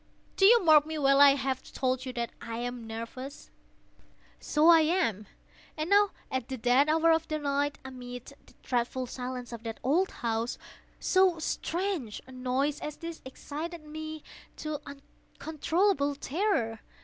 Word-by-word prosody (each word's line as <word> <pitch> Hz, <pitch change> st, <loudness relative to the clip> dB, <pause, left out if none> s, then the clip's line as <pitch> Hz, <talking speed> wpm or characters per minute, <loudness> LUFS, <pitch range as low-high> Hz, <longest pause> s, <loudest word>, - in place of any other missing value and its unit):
—do 390 Hz, -, +6 dB
you 470 Hz, -1 st, +6 dB
mark 310 Hz, -3 st, +7 dB
me 315 Hz, 0 st, -4 dB
well? 275 Hz, -1 st, +4 dB
I 280 Hz, -1 st, +8 dB
have 265 Hz, -1 st, -2 dB
told 255 Hz, 0 st, -1 dB
you 255 Hz, -, -4 dB
that 235 Hz, -1 st, -3 dB
I 230 Hz, -1 st, -5 dB
am 240 Hz, -1 st, -5 dB
nervous: 230 Hz, +5 st, -7 dB, 0.9 s
so 305 Hz, +2 st, +2 dB
I 335 Hz, -1 st, +9 dB
am. 310 Hz, -, +1 dB, 0.5 s
And 310 Hz, +4 st, -3 dB
now 410 Hz, 0 st, +6 dB, 0.2 s
at 260 Hz, -2 st, -2 dB
the 260 Hz, -, -3 dB
dead 250 Hz, +5 st, +3 dB
hour 325 Hz, +1 st, +4 dB
of 325 Hz, 0 st, +2 dB
the 310 Hz, -, -1 dB
night, 285 Hz, 0 st, -1 dB
amid 250 Hz, -1 st, -8 dB
the -, -, -20 dB
dreadful 250 Hz, +1 st, -1 dB
silence 250 Hz, 0 st, -6 dB
of 230 Hz, -, -7 dB
that 225 Hz, -1 st, -6 dB
old 340 Hz, +9 st, +2 dB, 0.2 s
house, 230 Hz, +1 st, -1 dB, 0.4 s
so 370 Hz, -2 st, +3 dB
strange 330 Hz, -, -2 dB
a 260 Hz, -, -14 dB
noise 260 Hz, +3 st, -1 dB
as 300 Hz, -, -6 dB
this 335 Hz, -1 st, -7 dB
excited 305 Hz, +5 st, -6 dB
me 310 Hz, 0 st, -7 dB, 0.3 s
to 305 Hz, -1 st, -4 dB
uncontrollable 305 Hz, +3 st, -1 dB
terror. 275 Hz, -, -1 dB
280 Hz, 155 wpm, -29 LUFS, 250-320 Hz, 0.9 s, I